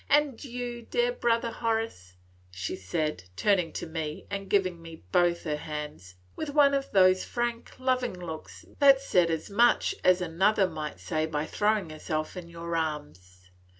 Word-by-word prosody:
And 290 -3 +2
you, 245 -2 -5
dear 485 - 0
brother 235 - +1
Horace," 225 - -2 0.3
she 90 -1 -4
said, 95 - -2
turning 180 - +2
to - - -4
me 160 -2 -5
and 195 -1 -4
giving 185 -4 +1
me 165 -1 -11
both 175 -1 +3
her 150 -2 -1
hands, 150 - -7 0.2
with 315 - -4
one 285 -1 +5
of 275 0 0
those 185 -1 +5
frank, 240 -1 -3
loving 255 -4 0
looks 160 -3 -8
that 275 -2 +7
said 180 -11 +2
as 160 +4 -3
much 235 +4 +4
as 185 0 +5
another 190 +4 +2
might 155 -3 -6
say 155 -1 -1
by 150 -1 -2
throwing 205 -4 0
herself 155 +1 -3
into 175 -2 -8
your 170 0 -5
arms. 90 - -5
180 Hz, 160 wpm, -28 LUFS, 155-235 Hz, 0.3 s, that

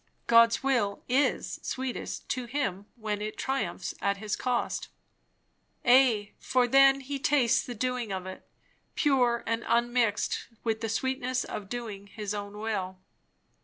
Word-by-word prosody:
God's 230 +1 +5
will 235 -7 +1
is 265 +4 +1
sweetest 260 -1 -4
to 255 -2 -2
him 205 -7 -2
when 215 -3 -3
It 215 +1 -4
triumphs 205 -10 -2
at 200 0 +1
his 210 +1 -2
cost." 250 -1 -1 1.0
Ay, 240 -5 +5
for 250 -1 +2
then 275 +2 +6
he 275 +1 -4
tastes 265 -3 +3
the 245 - -6
doing 250 -1 -2
of 190 -1 -3
it, 185 0 -8 0.5
pure, 250 -5 +2
and 230 +1 -1
unmixed 235 -2 +1 0.2
with 225 -1 -1
the 225 - -2
sweetness 255 +2 -1
of 200 -2 -6
doing 215 -5 -6
his 210 0 -5
own 205 0 -6
will. 200 -4 -3
235 Hz, 140 wpm, -29 LUFS, 210-255 Hz, 1.0 s, then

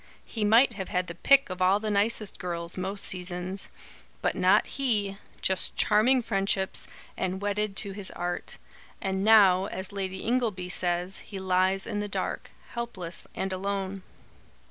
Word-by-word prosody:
He 220 - -4
might 230 +4 +5
have 195 -3 -5
had 180 0 0
the 170 - -7
pick 275 +6 +4
of 185 0 -5
all 190 +2 +4
the 215 0 -2
nicest 210 +1 0
girls, 170 -1 -4
most 195 +2 -2
seasons. 180 +1 -3 0.6
But - - +2
not - - +4
he! 210 -8 -1 0.2
Just 190 -1 +2
charming 240 +5 +4
friendships, 195 -3 0 0.3
and 185 0 -2
wedded 205 0 -1
to 200 0 -1
his 195 -1 -4
art. 175 0 -3 0.4
And 190 0 -1
now, 200 -4 +6
as 190 -2 -5
Lady 190 -1 -4
Ingleby, 220 -7 0
says, 180 +1 -1
he 195 - -8
lies 190 +1 +2
in 205 - -3
the 205 - -2
dark, - - -3 0.2
helpless 210 -8 -5
and 190 0 -2
alone." 195 0 -3
195 Hz, 155 wpm, -28 LUFS, 185-210 Hz, 0.6 s, now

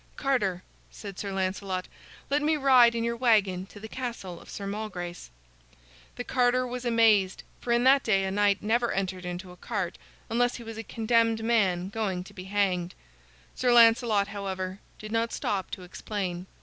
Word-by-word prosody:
"Carter," 205 -10 0 0.3
said 200 -3 -9
Sir 200 - -4
Lancelot, 190 -1 -2 0.4
"let 290 +1 +2
me 310 +1 +2
ride 255 -4 +6
in 230 - -1
your 235 0 -1
wagon 205 -6 +2
to 205 - -13
the 220 - -8
castle 230 -8 -6
of - - -15
Sir 200 - -6
Malgrace." 190 - -5 0.9
The 245 - -4
carter 250 0 +2
was 250 0 -5
amazed, 220 -5 +3 0.2
for 240 - -3
in 235 0 +3
that 270 +2 +6
day 195 -5 +2
a 190 - -1
knight 205 0 +2
never 235 +3 +1
entered 185 -1 -3
into 180 +1 -6
a - - -12
cart 190 -4 -4 0.3
unless 245 +2 +1
he 240 - -8
was 225 -1 -7
a - - -4
condemned 225 0 +1
man 190 -6 +1
going 195 -4 -2
to - - -14
be 185 - -9
hanged. 190 -3 0 0.6
Sir 250 -1 +1
Lancelot, 230 -3 +5
however, 190 -2 -4 0.2
did 215 0 -9
not 230 +1 0
stop 195 -2 -2
to 185 - -7
explain. 180 -1 -5
210 Hz, 175 wpm, -28 LUFS, 190-235 Hz, 0.9 s, ride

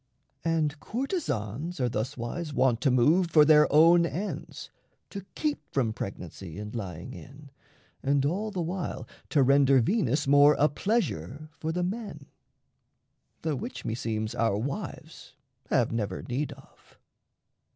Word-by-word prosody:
And 155 -3 0
courtesans 170 - -3
Are 125 - +1
thuswise 125 +7 -4
wont 125 -4 +2
to 140 - +3
move 155 +9 +3
for 155 -2 +6
their 150 0 +6
own 165 +3 +6
ends, 185 +5 -5 0.4
To 200 -2 -7
keep 300 -2 -1
from 120 -6 0
pregnancy 90 -4 -7
and 105 +1 -7
lying 95 0 -6
in, 140 +1 -12 0.5
And 140 0 +1
all 195 +9 -1
the 185 -4 -3
while 180 +2 -4 0.2
to 145 -3 +3
render 135 0 +5
Venus 145 - +1
more 145 +1 +6
A 150 - +4
pleasure 155 - -2
for 160 - -2
the 180 +2 -1
men 190 -6 -5 1.2
the 155 -2 0
which 125 -1 -6
meseems 110 -1 -2
Our 115 -3 +1
wives 135 +6 -6 0.3
have - - +2
never 105 -5 -3
need 140 +4 -3
of. 135 0 -21
145 Hz, 135 wpm, -28 LUFS, 120-165 Hz, 1.2 s, for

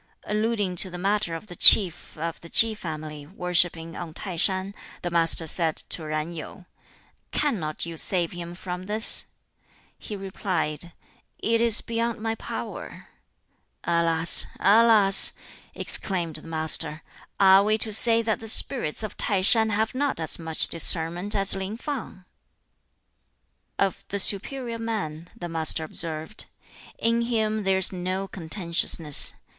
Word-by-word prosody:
Alluding 210 -3 -2
to 185 - -1
the 180 - -8
matter 195 -2 -1
of 165 - -9
the 180 -4 -10
Chief 180 -5 +5
of 165 +1 -5
the 170 - -11
Ki 225 +5 +4
family 155 -6 -8
worshipping 170 -2 +1
on 165 -2 -8
Tai 190 -4 -6
shan, 190 +3 0 0.3
the 175 - -4
Master 165 -1 +3
said 160 0 +3
to 160 -3 -4
Yen 155 +2 -4
Yu, 170 +3 -10 0.6
"Cannot 180 - -3
you 165 -1 -8
save 175 0 0
him 175 0 -8
from 180 0 -7
this?" 215 +2 +2 0.7
He 210 - -8
replied, 180 -4 -4 0.4
"It 230 +1 0
is 230 -2 +5
beyond 230 0 -3
my 225 +1 -3
power." - - -8 0.7
"Alas, 170 -1 +2
alas!" 210 -2 +5 0.4
exclaimed 170 -5 -2
the 155 - -13
Master, 155 -1 0 0.4
"are 195 0 +6
we 215 +1 +1
to 220 0 -1
say 230 +1 +5
that 220 -1 -2
the 225 - -9
spirits 220 - +1
of 215 - -7
T'ai 195 -4 0
shan 220 +1 +4
have 220 +1 -1
not 280 -3 -2
as 160 +1 0
much 160 -1 0
discernment 170 +3 +1
as 195 0 +2
Lin 195 +3 -6
Fang?" 240 -9 -7 1.5
Of 195 -1 -2
"the 200 - -4
superior 230 +5 +2
man," 185 -8 -5
the 175 - -7
Master 160 -1 +1
observed, 160 +4 -3 0.5
"In 230 +1 0
him 220 -2 -1
there 190 0 +1
is 190 - +2
no 185 +1 -4
contentiousness. 170 -4 +1
185 Hz, 140 wpm, -24 LUFS, 165-215 Hz, 1.5 s, are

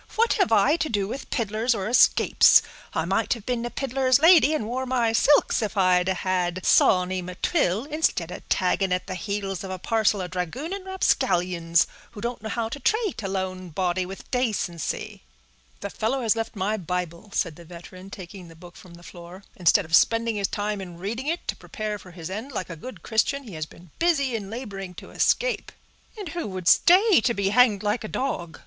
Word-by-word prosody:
"What 460 +1 +3
have 390 - +1
I 225 +9 +4
to 315 - -2
do 205 -3 -1
with 265 +6 -7
piddlers, 225 +1 0
or 195 -2 -3
escapes? 240 - +5 0.3
I 160 - -1
might 195 +5 +1
have 225 -3 -12
been 245 -2 -2
a - - -5
piddler's 260 0 +1
lady, 325 0 +6
and 260 - -2
wore 255 +3 -3
my 240 -3 +1
silks, 285 +3 +3
if 215 -1 -3
I'd 180 -1 +3
had 185 -1 -1
Sawny 185 0 +3
M'Twill, 180 - -1
instead 295 - -1
of - - -10
tagging 185 +1 +1
at 180 0 0
the 190 - -5
heels 195 0 -4
of 190 - -6
a 185 - -4
parcel 215 0 +1
of 180 -1 -6
dragooning 275 - -4
rapscallions, 180 - +1 0.3
who 215 - -9
don't 235 +1 -4
know 220 - -6
how 230 +1 -2
to 285 - -6
trate 435 - 0
a 195 - -3
lone 185 -1 -4
body 180 +2 -1
with 195 +1 -10
dacency." 215 - -2 0.6
"The 200 - -5
fellow 245 +4 -1
has 225 -1 +3
left 225 0 -4
my 205 +2 -1
Bible," 180 +1 -4
said 170 -7 -1
the 170 - -13
veteran, 180 +3 -12
taking 185 -1 -10
he 165 - -13
book 175 +1 -14
from 175 -2 -14
the 175 - -16
floor. 175 +2 -12
"Instead 180 +2 +3
of 165 +1 +3
spending 230 +3 +3
his 200 -2 0
time 205 -1 -3
in 175 -3 -9
reading 225 +9 -4
it 335 +3 -3
to - - -2
prepare 215 -5 -5
for 185 - -14
his 170 0 -8
end 220 +8 -6
like 185 -4 -4
a - - -6
good 255 +11 -10
Christian, 275 +5 0
he 220 -7 -11
has 155 -1 -5
been 170 0 -17
busy 280 -7 +1
in 200 -3 -5
laboring 200 -6 -7
to - - -11
escape." - - 0 0.5
"And 400 -6 -6
who 340 -3 -4
would 185 -3 -6
stay 370 - +6
and 235 - +1
be 200 -1 0
hanged 215 -2 +4
like 210 +3 -1
a - - -4
dog?" 175 -11 -4
205 Hz, 205 wpm, -25 LUFS, 180-245 Hz, 0.6 s, lady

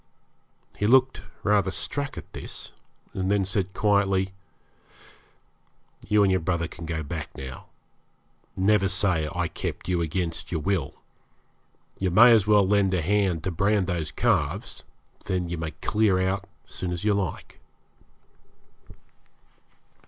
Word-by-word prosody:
He 105 - +1
looked 130 +2 +4 0.2
rather 105 -2 +3
struck 140 +9 -3
at - - -9
this, - - -7 0.4
and 95 0 -2
then 100 -1 +2
said 95 0 -2
quietly 95 -2 +2 1.7
'You 105 0 +4
and 95 - +3
your 95 - +2
brother 85 0 -1
can 85 0 -9
go 80 -1 -3
back 75 0 -5
now. 65 -1 -8 0.9
Never 100 +1 +3
say 90 -5 0
I 90 +1 -1
kept - - -5
you 90 -2 0
against 85 0 -3
your 85 - -1
will. 90 -5 -1 1.0
You 95 - +1
may 115 +7 +7
as 110 -4 +4
well 105 -2 +5
lend 100 -2 +2
a 90 - 0
hand 95 -3 +1
to 95 - -1
brand 100 +3 +1
these 85 -4 -2
calves; - - -1 0.4
then 90 -3 -2
you 85 -1 -4
may 80 -1 -3
clear 100 +4 +1
out 95 +1 -1 0.2
as - - -15
soon 90 - -3
as 90 +1 -4
you 105 -1 +3
like.' 100 -5 -4
95 Hz, 140 wpm, -26 LUFS, 85-100 Hz, 1.7 s, may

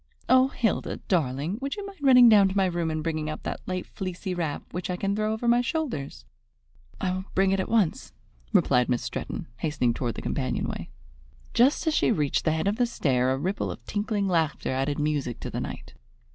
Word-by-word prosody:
Oh, 260 +1 +6
Hilda, 240 -5 -1
darling, 155 - 0
would 275 +1 -2
you 410 - -6
mind 395 -1 -10
running 250 -3 +8
down 210 -3 +7
to 190 - -3
my 195 - +4
room 170 -2 -1
and 155 -1 -2
bringing 155 -1 -2
up 155 - -6
that - - -4
light 185 -1 -3
fleecy 185 0 -5
wrap, 165 -5 -3
which 180 +1 -4
I 180 - 0
can 200 +2 -1
thrown 215 0 0
over 220 +2 -2
my 240 +1 +5
shoulders?" 235 - -3 0.7
"I 185 - 0
will 185 +1 -3
bring 195 0 +3
it 195 - +1
at 190 - -2
once," 215 -8 +1 0.4
replied 125 0 +3
Miss 125 -1 0
Stretton, - - -4
hastening 125 -4 0
toward 120 -1 -3
the - - -6
companion 130 -3 -1
way. - - -5 0.6
Just 265 +7 +3
as 315 - +2
she - - +3
reached 150 -10 0
the 160 - +3
head 160 +3 0
of 205 +2 +1
the 245 -1 +2
stair 130 - +1
a 130 - 0
ripple 185 +8 -2
of - - -8
tinkling 205 -1 -1
laughter 165 -7 0
added 135 +2 -1
music 145 -5 -1
to - - -5
the - - -3
night. - - -7
185 Hz, 215 wpm, -26 LUFS, 150-220 Hz, 0.7 s, running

